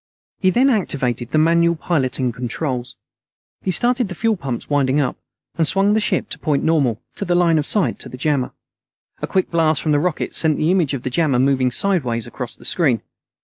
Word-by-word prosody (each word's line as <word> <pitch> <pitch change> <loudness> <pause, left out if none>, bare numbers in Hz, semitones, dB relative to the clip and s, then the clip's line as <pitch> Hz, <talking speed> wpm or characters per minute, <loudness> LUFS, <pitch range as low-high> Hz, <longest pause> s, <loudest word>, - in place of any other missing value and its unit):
He 185 - +3
then 255 +8 +3
activated 130 - -1
the - - 0
manual 170 +2 +3
piloting 135 -6 -1
controls. 125 +1 -4 0.7
He - - -3
started 240 +5 +3
the 185 - -6
fuel 225 +4 +1
pumps 135 - -5
winding 140 -1 +1
up, 135 -4 0 0.4
and 160 - +3
swung 195 +7 +2
the 220 - +3
ship 210 - -1
to - - -5
point 150 -4 0
normal 140 -9 +1 0.2
to - - -3
the 175 -2 0
line 170 -3 +3
of 145 - -2
sight 175 - 0
to - - -7
the 125 - -9
jammer. 140 -2 0 0.7
A - - -2
quick 190 -1 0
blast 160 -3 +2
from 155 - -1
the 145 - +3
rockets 170 +1 -1
sent 155 -2 +3
the 155 +3 +1
image 170 -7 +1
of 130 - -7
the 130 - -3
jammer 150 -2 +1
moving 130 0 +2
sideways 125 - 0
across 120 0 -7
the - - -15
screen. 135 - +1
155 Hz, 205 wpm, -20 LUFS, 130-175 Hz, 0.7 s, He